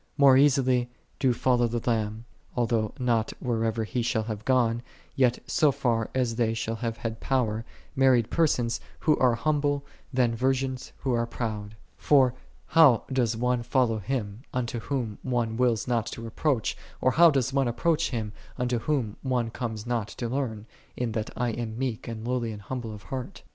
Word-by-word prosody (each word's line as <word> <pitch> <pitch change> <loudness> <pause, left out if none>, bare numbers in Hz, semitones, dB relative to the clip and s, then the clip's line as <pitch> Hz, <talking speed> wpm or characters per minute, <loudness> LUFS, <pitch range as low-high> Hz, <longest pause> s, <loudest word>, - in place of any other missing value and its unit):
More 140 -2 +7
easily 130 -3 +4 0.3
do 130 - +3
follow 120 0 +2
the 115 0 -4
Lamb, 110 -1 -1 0.3
although 115 -3 +1
not 120 -4 +1
whithersoever 115 -2 0
He 120 +3 -2
shall 115 -1 0
have 110 -1 -5
gone, 120 -3 +2 0.3
yet 125 -2 +3
so 155 -4 +3
far 120 -5 0
as 120 -3 0
they 115 -2 +1
shall 115 0 -2
have 115 -1 -3
had 115 -1 -4
power, 115 -5 0 0.3
married 130 -4 +4
persons 125 -8 +1 0.2
who 155 - +4
are 125 -2 +4
humble, 145 0 0 0.3
than 125 -3 +2
virgins 130 +1 -1
who 130 -2 0
are 115 0 +1
proud. 110 -3 -4 0.2
For 130 -4 +4 0.3
how 145 -9 +6
doth 120 -3 +1
one 125 +1 +1
follow 120 -2 +1
Him, 105 -1 -3
unto 120 -1 -2
Whom 115 -4 -3
one 120 -3 -1
wills 120 -3 +1
not 115 -2 0
to 115 - -7
approach? 120 +1 0 0.2
or 130 - +3
how 170 +5 +7
doth 135 -3 0
one 135 -2 +2
approach 160 +7 +1
Him, 110 -4 -3 0.2
unto 125 -2 0
Whom 120 -6 -1
one 125 -4 0
conies 110 -3 -4
not 120 -3 -1
to 120 - -5
learn, 115 -4 -3 0.2
" - - -31
in 120 -2 -1
that 110 0 -2
I 120 -1 0
am 115 -1 -4
meek 125 -4 -3
and 115 0 -5
lowly 120 -4 -1
of 110 -1 -6
heart 130 -2 -6
120 Hz, 175 wpm, -27 LUFS, 115-130 Hz, 0.3 s, More